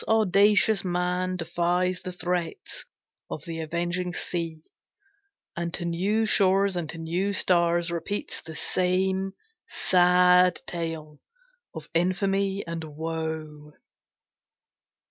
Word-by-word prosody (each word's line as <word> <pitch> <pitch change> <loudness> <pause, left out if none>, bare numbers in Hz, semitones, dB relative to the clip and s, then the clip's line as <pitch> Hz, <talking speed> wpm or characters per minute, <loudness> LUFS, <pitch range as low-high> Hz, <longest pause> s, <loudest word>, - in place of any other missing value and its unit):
Audacious 210 0 +4
man 180 0 -1
Defies 175 +2 0
the 185 - -5
threats 175 -1 -3 0.4
of 150 - -6
the 165 -1 -5
avenging 175 +3 -2
sea, 165 -3 -4 0.9
And 170 0 -3
to 175 - -3
new 195 +6 +1
shores 195 -2 +3
and 170 -3 -3
to - - -6
new 175 +5 -1
stars 175 -2 +2
repeats 170 +5 -4
The 160 - -10
same 190 +2 0 0.3
sad 180 0 +4
tale 160 -3 -5 0.6
of 160 -2 -7
infamy 195 +3 0
and 170 -1 -5
woe. 155 -1 -5
175 Hz, 105 wpm, -26 LUFS, 165-185 Hz, 0.9 s, Audacious